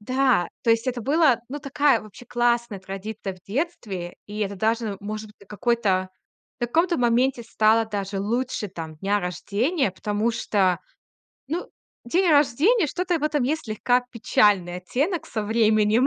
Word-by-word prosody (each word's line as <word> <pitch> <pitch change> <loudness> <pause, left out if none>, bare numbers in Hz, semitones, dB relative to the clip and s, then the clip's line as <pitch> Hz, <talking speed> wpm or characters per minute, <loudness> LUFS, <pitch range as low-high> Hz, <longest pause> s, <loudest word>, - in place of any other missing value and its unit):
Да, 255 -5 +2
то 230 - +2
есть 230 +2 +2
это 250 -1 -1
было, 275 -1 +3
ну, 290 - -5
такая 275 -3 +2
вообще 215 +3 -13
классная 235 -3 +1
традиция 195 +1 -6
в 185 - -20
детстве. 205 - -4
И 210 +1 -7
это 200 -1 -2
даже 225 +3 +1
н 200 -2 -3
может 215 +1 -5
быть, 200 - -19
какой-то, 205 -4 0 0.5
в - - +1
каком-то 335 +6 +1
моменте 245 +1 +2
стало 225 0 +3
даже 200 -2 -3
лучше 230 0 -2
там 160 -3 -8
дня 200 +5 0
рождения, 205 - -1
потому 210 +4 -1
что, 190 -5 +1 0.7
ну, 340 +4 -3 0.4
день 345 +8 +2
рождения, 305 - +4
что-то 355 +2 -1
в - - -11
этом 300 -3 +1
есть 305 +5 0
слегка 245 +3 +1
печальный 205 -6 +2
оттенок 285 - -2
со 215 -2 -3
временем. 220 +2 +3
225 Hz, 155 wpm, -24 LUFS, 205-265 Hz, 0.7 s, рождения